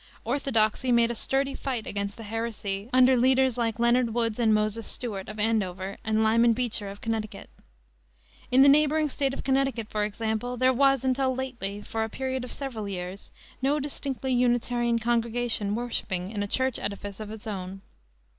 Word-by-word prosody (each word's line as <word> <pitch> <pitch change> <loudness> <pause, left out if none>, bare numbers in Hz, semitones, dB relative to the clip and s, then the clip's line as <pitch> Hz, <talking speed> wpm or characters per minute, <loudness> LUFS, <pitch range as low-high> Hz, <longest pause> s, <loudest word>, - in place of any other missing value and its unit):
Orthodoxy 245 -1 +1
made 235 -1 +4
a - - -1
sturdy 270 +4 0
fight 255 -7 -3
against 200 0 -3
the 225 - -8
heresy, 215 -2 -4
under 255 0 +6
leaders 260 0 +3
like 230 -3 -1
Leonard 235 -1 +2
Woods 230 -1 0
and 225 -2 +3
Moses 215 +1 +1
Stuart, 205 -7 -4
of 215 - -7
Andover, 200 -3 0
and 220 0 +1
Lyman 230 +2 +4
Beecher, 225 -4 -2
of 200 +1 -10
Connecticut. 220 -2 -4 1.0
In 260 +2 +6
the - - +7
neighboring 300 +2 +4
State 275 0 -1
of 270 - -6
Connecticut, 265 -4 0
for 210 -1 0
example, 220 +3 -2
there 255 +1 +4
was 270 0 +3
until 260 0 +1
lately, 235 -6 -4
for 225 0 -2
a 220 - -3
period 260 +2 -3
of 250 - -6
several 230 -7 -5
years, 185 0 -6 0.3
no 280 +3 +2
distinctly 270 -2 -2
Unitarian 240 -1 +2
congregation 230 -2 0
worshiping 205 -6 -3
in 210 -2 -3
a 205 - -1
church 260 +3 0
edifice 200 0 -5
of 215 -1 -6
its 215 -1 -9
own. 195 -2 -5
235 Hz, 175 wpm, -27 LUFS, 215-260 Hz, 1.0 s, the